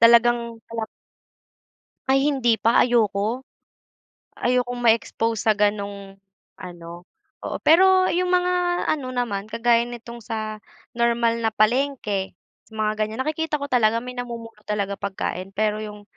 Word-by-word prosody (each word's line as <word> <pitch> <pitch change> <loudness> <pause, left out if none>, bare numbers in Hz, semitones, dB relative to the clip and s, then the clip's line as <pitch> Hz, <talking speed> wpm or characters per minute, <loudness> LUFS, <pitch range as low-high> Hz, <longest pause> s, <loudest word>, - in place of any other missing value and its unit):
Talagang 235 +1 +6 0.2
kalat 225 -1 -4 1.2
Ay 270 +2 +3
hindi 240 -7 +2
pa, 230 +1 +4
ayoko. 230 +1 0 0.9
Ayokong 245 0 0
ma-expose 225 0 +2
sa 220 - +5
ganong 200 -1 -2 0.4
ano, 175 -1 -10 0.3
oo - - -5
pero 370 +3 +5
yung 360 +1 +1
mga 360 0 +2 0.4
ano 260 -4 -2
naman 215 -5 -2
kagaya 235 +1 +2
nitong 235 0 -9
sa 215 -1 -5 0.3
normal 235 0 +1
na 225 -1 -1
palengke, 215 -4 0 0.3
sa 220 - -24
mga 215 0 0
ganyan 215 +4 -1
nakikita 310 -1 -2
ko 285 - -4
talaga 230 -2 +3
may 250 0 -8
namumulot 230 -3 -7
talaga 200 -1 -2
pagkain 195 -1 -4
pero 215 0 0
yung 210 -1 -7
230 Hz, 130 wpm, -23 LUFS, 210-250 Hz, 1.2 s, Talagang